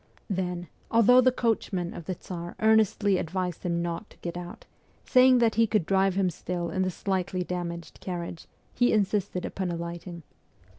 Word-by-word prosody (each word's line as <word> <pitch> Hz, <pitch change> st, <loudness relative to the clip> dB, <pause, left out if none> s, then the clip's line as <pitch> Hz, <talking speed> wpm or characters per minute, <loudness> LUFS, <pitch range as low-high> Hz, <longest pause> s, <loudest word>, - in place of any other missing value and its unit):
Then, 180 Hz, -2 st, -2 dB, 0.2 s
although 240 Hz, +2 st, +6 dB
the 255 Hz, 0 st, +4 dB
coachman 210 Hz, -7 st, -1 dB
of 170 Hz, -, -8 dB
the 185 Hz, -, -3 dB
Tsar 175 Hz, 0 st, -7 dB
earnestly 215 Hz, -3 st, +3 dB
advised 180 Hz, 0 st, -3 dB
him 170 Hz, -1 st, -1 dB
not 170 Hz, +5 st, -4 dB
to -, -, -19 dB
get 170 Hz, 0 st, -6 dB
out, 175 Hz, 0 st, -8 dB, 0.4 s
saying 255 Hz, 0 st, +6 dB
that 230 Hz, -2 st, +3 dB
he 225 Hz, +1 st, +3 dB
could 210 Hz, -5 st, +1 dB
drive 195 Hz, 0 st, +2 dB
him 190 Hz, -2 st, +2 dB
still 170 Hz, +1 st, -4 dB
in 190 Hz, -, -1 dB
the 185 Hz, -, +1 dB
slightly 185 Hz, 0 st, -2 dB
damaged 170 Hz, -1 st, -5 dB
carriage, 175 Hz, -2 st, -6 dB, 0.3 s
he 245 Hz, 0 st, +3 dB
insisted 200 Hz, -3 st, 0 dB
upon 190 Hz, -2 st, -3 dB
alight 170 Hz, +1 st, -5 dB
ing. 170 Hz, -2 st, -8 dB
185 Hz, 170 wpm, -27 LUFS, 175-210 Hz, 0.4 s, although